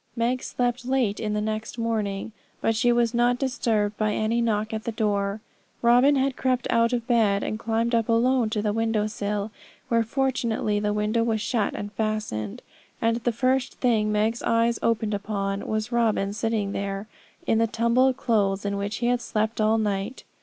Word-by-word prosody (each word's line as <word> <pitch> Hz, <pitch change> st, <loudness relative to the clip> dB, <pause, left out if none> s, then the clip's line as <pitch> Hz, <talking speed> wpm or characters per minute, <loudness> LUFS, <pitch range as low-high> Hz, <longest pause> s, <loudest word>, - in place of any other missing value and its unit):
Meg 245 Hz, +2 st, 0 dB
slept 245 Hz, 0 st, -1 dB
late 250 Hz, -5 st, 0 dB
in 210 Hz, -1 st, -2 dB
the 215 Hz, +1 st, -2 dB
morning, 220 Hz, -3 st, -2 dB, 0.3 s
but 225 Hz, -, +1 dB
she 240 Hz, +2 st, +3 dB
was 235 Hz, -1 st, +2 dB
not 240 Hz, +1 st, +3 dB
disturbed 225 Hz, -6 st, 0 dB
by 215 Hz, -1 st, +1 dB
any 225 Hz, +2 st, +1 dB
knock 220 Hz, -1 st, 0 dB
at 220 Hz, 0 st, -3 dB
the 230 Hz, -, -2 dB
door. 205 Hz, -1 st, -1 dB, 0.4 s
Robin 245 Hz, +5 st, +5 dB
had 270 Hz, -1 st, +1 dB
crept 255 Hz, -2 st, 0 dB
out 230 Hz, 0 st, +3 dB
of 240 Hz, -2 st, -1 dB
bed 220 Hz, -5 st, +2 dB
and 215 Hz, -, -3 dB
climbed 230 Hz, +1 st, 0 dB
up 230 Hz, -1 st, +1 dB
alone 235 Hz, 0 st, +3 dB
to 215 Hz, -1 st, -2 dB
the 210 Hz, -1 st, 0 dB
window 225 Hz, -1 st, +1 dB
sill, 210 Hz, 0 st, -3 dB, 0.4 s
where 230 Hz, -2 st, +3 dB
fortunately 230 Hz, -4 st, 0 dB
the 210 Hz, 0 st, 0 dB
window 210 Hz, +2 st, +1 dB
was 225 Hz, -1 st, 0 dB
shut 220 Hz, -1 st, -1 dB
and 205 Hz, 0 st, -6 dB
fastened; 210 Hz, -, -3 dB, 0.4 s
and 230 Hz, 0 st, +1 dB
the 240 Hz, +1 st, 0 dB
first 255 Hz, +3 st, 0 dB
thing 220 Hz, -4 st, +1 dB
Meg's 215 Hz, +2 st, +1 dB
eyes 230 Hz, 0 st, +2 dB
opened 220 Hz, -2 st, 0 dB
upon 200 Hz, -1 st, -3 dB
was 215 Hz, +2 st, -2 dB
Robin 220 Hz, -4 st, +1 dB
sitting 215 Hz, -2 st, -1 dB
there, 195 Hz, +1 st, -4 dB, 0.4 s
in 225 Hz, -, +2 dB
the 230 Hz, -, +3 dB
tumbled 235 Hz, +4 st, +2 dB
clothes 205 Hz, -4 st, +1 dB
in 200 Hz, 0 st, -1 dB
which 200 Hz, +1 st, -3 dB
he 235 Hz, -, -2 dB
had 245 Hz, 0 st, +2 dB
slept 220 Hz, -1 st, -1 dB
all 215 Hz, +1 st, +3 dB
night. 210 Hz, +2 st, -2 dB
225 Hz, 180 wpm, -25 LUFS, 210-235 Hz, 0.4 s, Robin